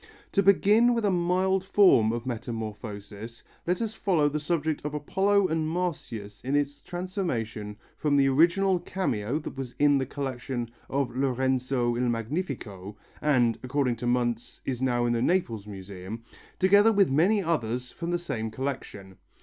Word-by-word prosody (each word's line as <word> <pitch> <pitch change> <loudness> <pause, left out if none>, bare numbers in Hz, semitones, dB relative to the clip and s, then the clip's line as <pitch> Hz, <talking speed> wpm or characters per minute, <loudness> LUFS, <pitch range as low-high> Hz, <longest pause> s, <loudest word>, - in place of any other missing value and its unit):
To 200 - +3
begin 210 +5 +5
with 230 -2 0
a 200 - +3
mild 185 +2 +1
form 185 - +5
of 120 +1 -4
metamorphosis, 110 -2 -6 0.2
let 180 +5 +1
us 220 -1 -3
follow 170 -9 +2
the 150 +1 -2
subject 155 0 -1
of 150 0 -4
Apollo 195 +6 +2
and 160 0 0
Marsyas 140 - -4
in 135 +3 -1
its 145 0 -1
transformation 125 - -4 0.2
from 145 -2 +1
the 135 -1 +4
original 175 +7 +3
cameo 140 - -2
that 155 - -6
was 135 -2 -6
in 145 -1 +4
the 130 - -2
collection 125 -3 -4 0.2
of 135 -3 -1
Lorenzo 130 -2 0
il 125 0 0
Magnifico 115 - -4 0.2
and, 125 -6 +2
according 130 -1 0
to 120 - -4
Muntz, 120 -1 -1
is 125 -2 -3
now 120 -2 +1
in 120 - +1
the 115 - 0
Naples 120 - 0
Museum, 100 +2 -8 0.3
together 205 +4 +5
with 200 -7 +3
many 190 +9 +3
others 125 -7 -1
from 170 -1 -5
the 175 - +1
same 115 -10 -4
collection. 110 -7 -6
135 Hz, 160 wpm, -27 LUFS, 115-175 Hz, 0.3 s, begin